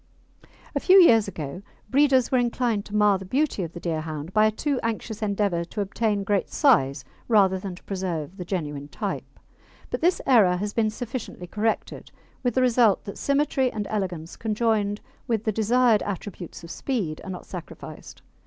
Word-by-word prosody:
A - - +2
few 380 +1 +6
years 225 - +6
ago 155 -2 -6 0.3
breeders 265 -2 +4
were 255 - +4
inclined 235 -3 0
to 210 - -7
mar 210 -2 +4
the - - -7
beauty 265 +2 0
of 170 -2 -5
the 175 - -7
Deerhound 160 -1 -4
by 215 0 +5
a - - +1
too 275 +4 -1
anxious 225 -1 -3
endeavour 200 -4 0
to 195 - -8
obtain 205 +1 0
great 200 0 0
size 140 - +3 0.2
rather 195 -4 +4
than 190 -1 -6
to - - -16
preserve 185 -3 -4
the 180 - -5
genuine 150 -6 -4
type; - - -5 0.5
but - - -2
this 350 +3 +3
error 205 -9 +5
has 205 +2 -3
been 220 -2 +2
sufficiently 230 -4 -6
corrected, 215 +4 -2 0.3
with 245 -3 -1
the 255 - +3
result 235 -5 +4
that 200 - -7
symmetry 280 -2 +1
and 210 -2 -3
elegance 180 -6 -3
conjoined 215 -2 0 0.3
with 225 -4 0
the 220 - +1
desired 225 +1 +3
attributes 190 -3 -6
of 170 - -9
speed 200 - -3
are - - -8
not 180 -1 -6
sacrificed. 180 -3 -10
210 Hz, 175 wpm, -25 LUFS, 180-235 Hz, 0.5 s, few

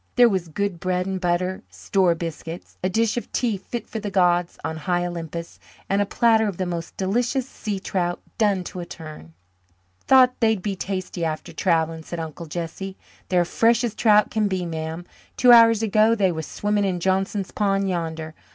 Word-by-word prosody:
There 245 -1 +7
was 190 -6 -1
good 190 +2 -2
bread 180 0 -1
and 190 -1 -3
butter, 180 +1 0
"store" 170 - +1
biscuits, 165 0 -7
a 185 - +2
dish 225 +4 +1
of 240 - -4
tea 235 -4 0
fit 225 +4 -6
for 220 - -5
the 210 -1 -4
gods 175 -2 +2
on 160 - -3
high 175 +2 0
Olympus, 170 -1 -6 0.3
and 200 +1 +1
a 205 - 0
platter 220 0 +3
of 195 -4 -4
the 185 - -1
most 170 -2 -5
delicious 240 +7 0
sea 210 -6 -4
trout, 175 -2 -2 0.2
done 200 -4 +2
to 180 - -7
a 175 - -5
turn. 155 - -10 0.7
"Thought 255 -1 +6
they'd 220 -5 +2
be 200 -2 -2
tasty 185 -2 -4
after 155 -1 -3
travelling," 165 -3 0
said 170 +1 -6
Uncle 160 +1 -6
Jesse. 175 +4 -5 0.3
"They're 180 -2 +3
fresh 230 +6 +2
as 235 -3 -1
trout 210 -2 +4
can 215 -2 +1
be, 185 -2 -2
ma'am. 160 +1 -5 0.3
Two 250 -1 +6
hours 230 -2 +7
ago 215 +1 +4
they 195 -4 +2
was 160 -2 -5
swimming 205 0 0
in 185 -2 -1
Johnson's 190 +2 0
pond 195 -1 +1
yander. 160 -3 -3
185 Hz, 190 wpm, -23 LUFS, 170-210 Hz, 0.7 s, There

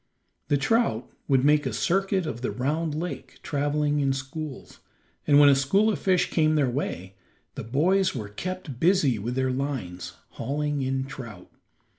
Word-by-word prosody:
The 145 - +2
trout 140 - +1 0.2
would 135 -2 +3
make 150 -1 +4
a 125 - -3
circuit 190 - +1
of 120 -6 -5
the 125 - -1
round 150 +5 -1
lake 175 +3 -6
traveling 145 0 0
in 135 -1 +2
schools, 135 +2 -7 0.5
and 145 - +6
when 145 - +8
a 140 - +7
school 195 +11 +3
of 180 - -3
fish 185 +1 +1
came 155 -1 +3
their 140 -5 +2
way, 95 -8 -4 0.4
the - - -6
boys 175 - +2
were 105 -5 -5
kept 170 - -6
busy 160 - +3
with 120 +5 -3
their 130 0 +1
lines, 125 -10 -4 0.2
hauling 145 0 -2
in 130 0 -1
trout. 115 -9 -10
145 Hz, 165 wpm, -26 LUFS, 130-160 Hz, 0.5 s, when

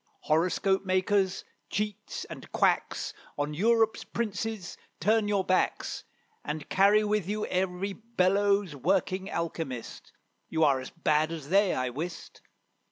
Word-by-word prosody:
Horoscope 180 +5 +2
makers, 190 0 +1 0.3
cheats, 210 -1 -3
and - - -10
quacks. - - +1 0.2
On 145 +1 -1
Europe's 225 +5 +2
princes 220 -4 -3 0.2
turn 215 0 +3
your 200 -2 +1
backs, 185 0 0 0.4
And 150 0 -4
carry 200 +3 +5
with 210 -3 0
you 210 +1 -1
every 185 +1 -1
bellows 200 -4 +1
working 185 +5 0
alchymist: 160 -7 -4 0.4
You 160 0 +1
are 140 -3 +4
as 130 - -7
bad 155 -1 +1
as 155 -4 -6
they, 195 +1 +4
I 130 -1 -1
wist. 165 +7 -6
185 Hz, 125 wpm, -29 LUFS, 160-205 Hz, 0.4 s, carry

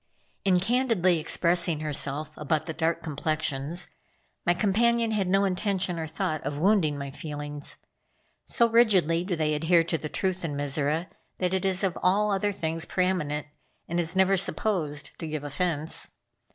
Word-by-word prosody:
In 185 -2 +4
candidly 205 -5 +2
expressing 170 0 +1
herself 150 0 -2
about 150 +1 -1
the 160 - -4
dark 165 +1 -1
complexions, 155 +1 -2 0.6
my 175 - +4
companion 230 +4 +2
had 205 -4 0
no 195 +2 +3
intention 190 -2 -1
or 160 - -3
thought 160 -1 -2
of 145 - -3
wounding 170 -4 +2
my 140 -1 -5
feelings. 145 0 -4 0.7
So 235 - +3
rigidly 195 -8 +4
do 180 -1 -2
they 155 -1 0
adhere 165 +3 +3
to 165 -1 -2
the 150 - -5
truth 185 +1 -2
in 150 -4 -3
Mizora 145 +3 +1 0.3
that 180 0 -1
it 190 0 0
is 190 0 +2
of 190 -3 0
all 205 +3 +3
other 200 +1 +1
things 165 -3 -3
pre 185 - +1
eminent, 150 -5 -1 0.4
and 170 +1 -1
is 170 +1 -1
never 190 +1 +4
supposed 175 -6 0
to 165 - -4
give 155 -2 -4
offense. 160 +1 0
170 Hz, 165 wpm, -27 LUFS, 155-190 Hz, 0.7 s, In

